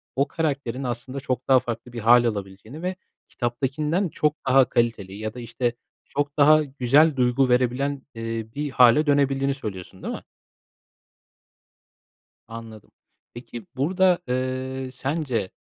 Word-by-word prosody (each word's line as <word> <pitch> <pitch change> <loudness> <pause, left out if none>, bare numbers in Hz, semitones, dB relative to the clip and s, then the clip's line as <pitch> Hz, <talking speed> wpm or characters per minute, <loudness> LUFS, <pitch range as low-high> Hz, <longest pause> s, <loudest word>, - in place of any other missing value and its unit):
o 140 +2 +2
karakterin, 140 -5 -2
aslında, 125 +2 -4
çok 130 -1 -3
daha 130 -1 +6
farklı 120 0 -6
bir 115 - -5
hâl 120 +2 +6
alabileceğini 105 +5 -5
ve 185 +1 -2 0.3
kitaptakinden 150 +9 -1
çok 150 0 0
daha 130 0 +6
kaliteli 115 -5 0
ya 110 0 -4
da, 125 - -9
işte, 120 +1 -2 0.4
çok 145 +1 -2
daha 155 +1 +6
güzel 140 +2 +3
duygu 125 +1 +2
verebilen, 130 +3 +1
eee, 115 0 -4
bir 145 +1 -2
hâle 125 +4 +5
dönebildiğini 140 -1 +2
söylüyorsun, 95 -7 -8
değil - - -3
mi? - - -7 2.2
Anladım. 115 -2 -10 0.4
Peki, 120 -2 -9
burada, 180 +6 +2
eee, 130 +1 -3
sence 130 - -2
130 Hz, 130 wpm, -24 LUFS, 120-140 Hz, 2.2 s, daha